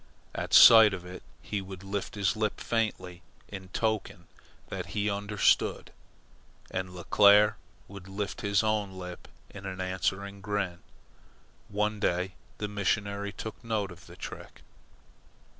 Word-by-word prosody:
At - - -4
sight 110 -4 +9
of 90 -1 -10
it 90 0 -9 0.2
he 105 - -3
would 95 -1 -9
lift 100 +1 -4
his 100 0 +1
lip 110 -1 -1
faintly 95 -6 -2 0.3
in 95 -2 -8
token 100 -3 -2 0.4
that - - -5
he 105 0 +1
understood, 100 0 +1 0.8
and 95 0 -3
Leclere 100 +4 +5 0.3
would 100 -2 -11
lift 95 0 -4
his 100 0 +2
own 105 -3 0
lip 90 -1 -8 0.2
in 100 -1 -8
an 95 -1 -6
answering 95 +2 -2
grin. 95 -4 -2 0.9
One 105 +1 -1
day 90 0 0 0.2
the 105 - -3
missionary 100 0 -1
took 110 +4 -8
note 110 -4 -2
of 90 0 -14
the - - -12
trick. - - -9
100 Hz, 135 wpm, -29 LUFS, 95-105 Hz, 0.9 s, sight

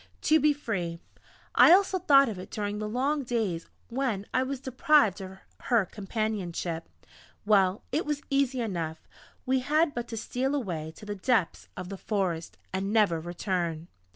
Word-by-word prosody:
To 315 +1 +5
be 300 0 +4
free! 200 - -3 0.6
I - - +8
also 380 0 +5
thought 275 -4 +6
of 210 -5 -4
it 185 - -9
during 205 0 -3
the 215 0 -3
long 275 +6 0
days 220 -9 -2 0.2
when 235 -5 -1
I 255 - +3
was 265 0 -3
deprived 260 -5 +3
of 190 0 -8 0.3
her 235 -6 +3
companionship.... 195 -5 -3 0.6
Well! 195 -1 +3
It 305 +5 +1
was 295 -1 -2
easy 275 -2 +1
enough! 165 -7 -4 0.4
We 260 +1 +2
had 300 +4 +2
but 240 0 -4
to 225 - -6
steal 260 +5 -1
away 170 - -3
to - - -12
the 205 - -3
depths 205 -2 0
of 180 0 -6
the 195 - -6
forest, 185 -6 -2 0.2
and 195 +1 -1
never 210 -7 +3
return! 170 -1 -3
215 Hz, 165 wpm, -28 LUFS, 185-265 Hz, 0.6 s, I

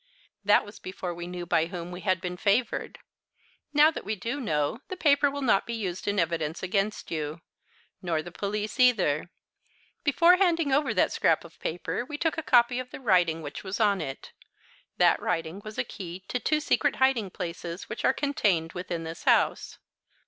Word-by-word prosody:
"That 205 +1 +4
was 205 +1 -12
before 185 -1 -5
we 175 0 -7
knew 180 -1 -5
by 165 -1 +2
whom 175 -1 -6
we 180 +1 -7
had 185 -2 +1
been 180 -1 -4
favoured. 205 +7 0 0.7
Now 300 +2 +6
that - - -7
we 215 +2 -2
do 235 +8 -4
know, 150 - -1
the 370 - -6
paper 290 -3 +4
will 285 0 -4
not 215 -6 +3
be 235 - -3
used 190 -5 -4
in 205 0 0
evidence 165 -2 -1
against 195 +3 -1
you 155 0 -3 0.6
nor 165 -3 -1
the 175 - -9
police 210 +6 -3
either. 190 - +3 0.7
Before 340 +5 +5
handing 335 -6 +2
over 285 +2 +2
that - - +3
scrap - - +2
of - - -15
paper 175 +7 -3
we 290 +4 -6
took 325 +1 0
a 320 - -2
copy 245 -3 +4
of 255 0 -6
the - - -9
writing 175 -9 +2
which 145 -1 -7
was 195 +2 -4
on 205 -3 +3
it. 135 0 -6 0.7
That - - +4
writing 165 +2 -2
was 215 +1 -9
a 255 - +1
key 185 -5 -8
to 250 - -1
two 305 +4 +1
secret 290 -1 +1
hiding 260 -6 +2
places 170 0 -6
which 215 - -6
are - - +5
contained 205 - 0
within 175 -2 -4
this 165 +1 -8
house." - - +2
200 Hz, 190 wpm, -27 LUFS, 175-255 Hz, 0.7 s, Now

